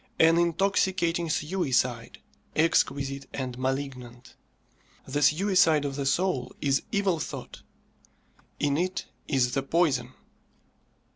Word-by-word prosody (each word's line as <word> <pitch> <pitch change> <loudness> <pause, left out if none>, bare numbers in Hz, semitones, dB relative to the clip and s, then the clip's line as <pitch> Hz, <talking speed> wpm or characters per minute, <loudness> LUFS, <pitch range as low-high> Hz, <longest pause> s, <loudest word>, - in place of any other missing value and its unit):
An 165 +1 +5
intoxicating 175 -1 +1
suicide, 135 -8 -1 0.4
exquisite 140 -4 +1
and 130 -2 -4
malignant. 130 -2 -4 0.7
The 145 +2 -2
suicide 160 -1 +4
of 140 -1 -3
the 140 -1 -2
soul 175 -5 0
is 140 -1 +1
evil 200 -5 +1
thought. - - -7 1.0
In 145 0 +1
it 185 +2 -2 0.2
is 130 -3 +1
the 135 - +1
poison. 135 -4 0
145 Hz, 100 wpm, -27 LUFS, 135-170 Hz, 1.0 s, An